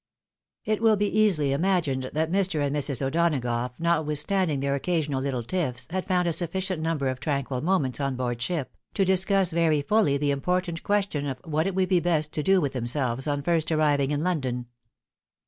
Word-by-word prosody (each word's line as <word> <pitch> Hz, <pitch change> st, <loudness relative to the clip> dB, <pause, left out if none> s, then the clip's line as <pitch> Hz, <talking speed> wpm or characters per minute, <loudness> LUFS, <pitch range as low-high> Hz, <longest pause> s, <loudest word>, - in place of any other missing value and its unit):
It 215 Hz, 0 st, 0 dB
will 220 Hz, -2 st, +4 dB
easily 200 Hz, -9 st, +2 dB
be -, -, +1 dB
imagined 145 Hz, -6 st, 0 dB
that 160 Hz, +2 st, 0 dB
Mr. 190 Hz, -4 st, +1 dB
and 140 Hz, +1 st, -1 dB
Mrs. 140 Hz, -2 st, +1 dB
O'Donagough, 130 Hz, -6 st, 0 dB
notwithstanding 160 Hz, 0 st, +1 dB
their 140 Hz, 0 st, 0 dB
occasional 145 Hz, -2 st, -1 dB
little 130 Hz, -3 st, -2 dB
tiffs, 130 Hz, -2 st, -3 dB
had 185 Hz, +1 st, -3 dB
found 180 Hz, -2 st, +1 dB
a -, -, +2 dB
suffi 170 Hz, +2 st, -1 dB
cient 185 Hz, -3 st, -2 dB
number 160 Hz, -4 st, -1 dB
of 130 Hz, -1 st, -2 dB
tranquil 140 Hz, -2 st, -2 dB
moments 150 Hz, -8 st, 0 dB
on 140 Hz, -2 st, -1 dB
board 120 Hz, -2 st, -3 dB
ship, 150 Hz, +1 st, -3 dB, 0.2 s
to 195 Hz, -, +2 dB
discuss 190 Hz, 0 st, +2 dB
very 160 Hz, -3 st, +2 dB
fully 205 Hz, -7 st, +2 dB
the 145 Hz, 0 st, 0 dB
important 175 Hz, +4 st, -1 dB
question 195 Hz, -8 st, -1 dB
of 135 Hz, -2 st, -3 dB
what 160 Hz, +2 st, -1 dB
it 195 Hz, -, -3 dB
would 185 Hz, -1 st, +1 dB
be 185 Hz, -2 st, +4 dB
best 160 Hz, -3 st, 0 dB
to 150 Hz, -, -2 dB
do 190 Hz, +4 st, +3 dB
with 145 Hz, -5 st, -1 dB
themselves 130 Hz, +1 st, -1 dB
on 145 Hz, -1 st, -1 dB
first 165 Hz, 0 st, +1 dB
arriving 145 Hz, -3 st, +2 dB
in 145 Hz, +1 st, -1 dB
London. 130 Hz, -9 st, -1 dB
155 Hz, 190 wpm, -26 LUFS, 140-180 Hz, 0.2 s, will